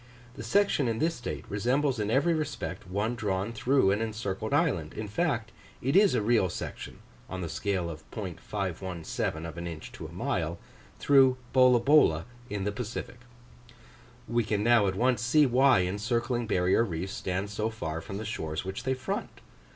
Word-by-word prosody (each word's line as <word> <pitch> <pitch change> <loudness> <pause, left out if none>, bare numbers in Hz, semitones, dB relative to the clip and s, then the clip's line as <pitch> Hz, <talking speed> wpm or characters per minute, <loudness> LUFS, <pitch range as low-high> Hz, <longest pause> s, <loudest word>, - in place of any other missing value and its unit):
The - - -9
section 145 - +2
in 115 -1 0
this 165 +6 +1
state 120 - -6
resembles 125 +5 0
in 105 -1 -1
every 140 +9 +3
respect 120 - -4
one 105 +5 -1
drawn 105 -1 -2
through 125 -3 +3
an 105 +3 0
encircled 110 -2 -3
island: 140 - +1
in 110 - -4
fact, 115 - -1 0.3
it 135 +6 -1
is 200 0 +6
a - - +1
real 110 -4 +3
section - - -6 0.3
(on 95 0 -5
the 85 - -3
scale 95 +1 -1
of 80 -2 -7
.517 90 -4 -4
of 85 +1 -7
an 85 - -4
inch 80 -2 -7
to - - -8
a - - -13
mile) - - -2 0.4
through 135 -2 +5 0.2
Bolabola 125 - +5 0.2
in 100 -1 -3
the 105 - 0
Pacific. 115 +3 -6 1.1
We 120 0 +1
can 105 -1 -1
now 115 -3 +5
at 95 - -1
once 125 +1 +2
see 145 +6 +4
why 130 -3 +5
encircling 115 +5 -1
barrier 95 +2 +3
reefs 95 -1 -4
stand 95 0 -3
so 105 +2 -1
far 80 -8 -4
from 95 - -6
the 110 - -5
shores 80 -6 -4
which 95 +1 -5
they 130 0 +1
front. 130 0 -4
110 Hz, 175 wpm, -29 LUFS, 95-125 Hz, 1.1 s, is